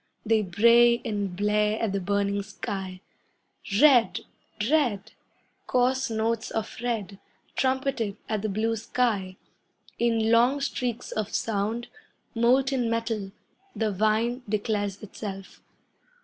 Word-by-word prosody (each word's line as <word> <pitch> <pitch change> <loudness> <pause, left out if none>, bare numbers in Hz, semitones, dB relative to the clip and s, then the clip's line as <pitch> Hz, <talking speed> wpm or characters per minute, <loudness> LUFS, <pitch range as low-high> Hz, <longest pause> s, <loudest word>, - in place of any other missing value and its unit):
They 220 0 +3
bray 235 +5 +5
and 205 -5 -2
blare 210 +2 +1
at 225 -3 0
the 200 - -1
burning 200 +1 0
sky. 190 -2 -6 0.8
Red! 265 -5 +5 0.5
Red! 235 -8 +1 0.6
Coarse 255 +1 +1
notes 225 0 -1
of 225 -1 -4
red, 215 -5 -3 0.4
Trumpeted 260 -6 0
at 215 -2 -1
the 215 - -2
blue 220 +3 0
sky. 215 -4 -1 0.6
In 225 -1 +2
long 245 +5 +4
streaks 250 -3 -3
of 215 -1 -3
sound, 220 +2 -1 0.5
molten 250 +1 +2
metal, 225 -4 -2 0.4
The 220 -2 0
vine 220 +5 +1
declares 205 -1 -2
itself. 195 -2 -8
220 Hz, 110 wpm, -26 LUFS, 205-235 Hz, 0.8 s, bray